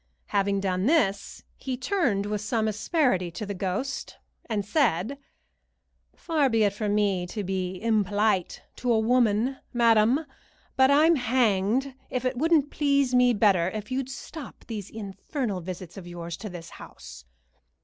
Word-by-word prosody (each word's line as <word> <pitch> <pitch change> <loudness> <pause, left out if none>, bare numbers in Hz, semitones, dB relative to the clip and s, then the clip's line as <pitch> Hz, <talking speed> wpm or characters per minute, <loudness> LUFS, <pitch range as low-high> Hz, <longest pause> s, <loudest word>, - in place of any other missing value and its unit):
Having 200 0 +1
done 185 +1 0
this, 205 -11 +1
he 260 -2 -4
turned 255 - 0
with 210 0 -2
some 220 +1 0
asperity 215 - +1
to 175 +5 -6
the 200 - -4
ghost, 195 +8 -3 0.3
and 210 -3 -1
said: 240 - +1 1.0
"Far 305 -5 +1
be 225 -2 +2
it 200 -1 +2
from 205 0 -1
me 195 -4 +1
to 210 +3 -4
be 185 -1 -3
impolite 210 -3 +1
to 250 - 0
a 225 - +4
woman, 240 +2 +2 0.2
madam, 235 +4 +4 0.5
but 265 0 +5
I'm 310 +3 +5
hanged 245 +1 +1 0.2
if 255 0 -3
it 255 0 0
wouldn't 300 +1 +2
please 280 -3 +1
me 250 0 +5
better 190 -5 +3
if 215 +3 -7
you'd 265 0 -2
stop 280 +2 -9
these 210 -4 -6
infernal 205 - -4
visits 180 0 -8
of 180 -3 -9
yours 170 -1 -6
to 215 - -7
this 175 -2 -9
house. - - -12
215 Hz, 150 wpm, -26 LUFS, 195-260 Hz, 1.0 s, but